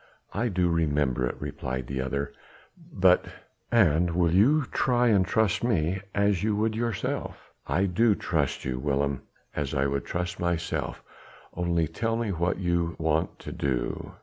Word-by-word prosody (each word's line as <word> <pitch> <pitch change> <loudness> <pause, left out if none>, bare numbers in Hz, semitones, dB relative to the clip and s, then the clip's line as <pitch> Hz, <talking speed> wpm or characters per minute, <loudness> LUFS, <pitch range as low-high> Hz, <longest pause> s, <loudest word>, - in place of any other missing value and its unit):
"I 120 - 0
do 90 -4 +1
remember 75 -6 +1
it," - - -4
replied 65 -1 -4
the 65 +1 -3
other, 70 +2 -3 0.6
"but...." 95 - +4 0.4
"And 85 -6 +3
will 85 -2 +3
you 135 - +4
try 125 -2 +2
and 100 -4 +4
trust 110 +3 +1
me 95 -5 +1
as 100 -2 +2
you 105 0 +1
would 110 +1 +1
yourself?" 115 -3 -3 0.2
"I 95 +4 +2
do 105 +3 +3
trust 75 -8 -1
you, 65 -1 -2
Willem, 70 0 0 0.3
as 75 -1 -2
I 65 0 +2
would 70 -1 -1
trust 90 +1 -3
myself; 85 -1 -2 0.5
only 85 -2 +1
tell 115 +8 -1
me 115 -3 -1
what 85 0 0
you 85 -2 0
want 80 0 0
to - - -7
do." 65 -3 -2
85 Hz, 155 wpm, -27 LUFS, 75-105 Hz, 0.6 s, but